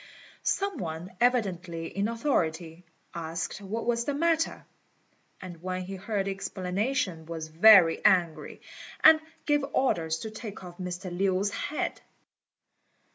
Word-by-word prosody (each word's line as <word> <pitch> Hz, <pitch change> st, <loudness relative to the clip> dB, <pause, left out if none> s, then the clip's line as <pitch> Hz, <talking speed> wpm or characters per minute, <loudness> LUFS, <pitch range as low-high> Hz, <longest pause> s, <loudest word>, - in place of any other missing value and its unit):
Some 395 Hz, -6 st, -1 dB
one, 170 Hz, +1 st, -5 dB
evidently 185 Hz, -9 st, 0 dB
in 200 Hz, +5 st, -2 dB
authority, 175 Hz, -, -1 dB, 0.3 s
asked 170 Hz, +3 st, -4 dB
what 215 Hz, +4 st, -4 dB
was 235 Hz, 0 st, 0 dB
the 285 Hz, -, -1 dB
matter; 325 Hz, +1 st, 0 dB, 0.7 s
and 175 Hz, -3 st, -9 dB
when 185 Hz, 0 st, -3 dB
he 190 Hz, +2 st, -7 dB
heard 195 Hz, +1 st, -2 dB
the 195 Hz, -, -1 dB
explanation, 190 Hz, -2 st, -2 dB
was 160 Hz, -1 st, -6 dB
very 175 Hz, 0 st, +7 dB
angry, 170 Hz, -4 st, +2 dB, 0.4 s
and 315 Hz, 0 st, +9 dB, 0.3 s
gave 295 Hz, -2 st, +2 dB
orders 165 Hz, -11 st, +1 dB
to 220 Hz, -, -5 dB
take 215 Hz, -3 st, -8 dB
off 175 Hz, 0 st, -11 dB
Mr. 180 Hz, 0 st, -5 dB
Lin's 195 Hz, +2 st, +1 dB
head. 300 Hz, -, -3 dB
190 Hz, 130 wpm, -28 LUFS, 170-230 Hz, 0.7 s, and